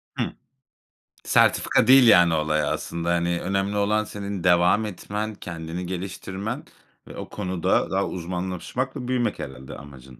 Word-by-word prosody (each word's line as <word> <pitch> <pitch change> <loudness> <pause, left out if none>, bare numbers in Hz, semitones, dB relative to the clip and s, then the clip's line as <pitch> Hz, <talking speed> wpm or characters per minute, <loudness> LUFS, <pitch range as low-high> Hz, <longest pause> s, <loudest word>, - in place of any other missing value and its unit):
Hı. - - 0 1.0
Sertifika - - +3
değil, 130 -1 +8
yani, 90 -6 +6
olay 75 -1 +1
aslında, 85 +3 -3
hani, 85 0 0
önemli 100 +2 -1
olan 105 +1 +2
senin 100 -3 -6
devam 90 +4 +4
etmen, 105 +2 -5
kendini 85 0 -6
geliştirmen 95 +3 -5 0.4
ve - - -10
o - - -7
konuda 95 -4 -1
daha - - +1
uzmanlaşmak 95 - -4
ve 125 -4 -5
büyümek 125 -2 0
herhâlde 65 0 -8
amacın 65 -3 -13
90 Hz, 135 wpm, -24 LUFS, 85-105 Hz, 1.0 s, değil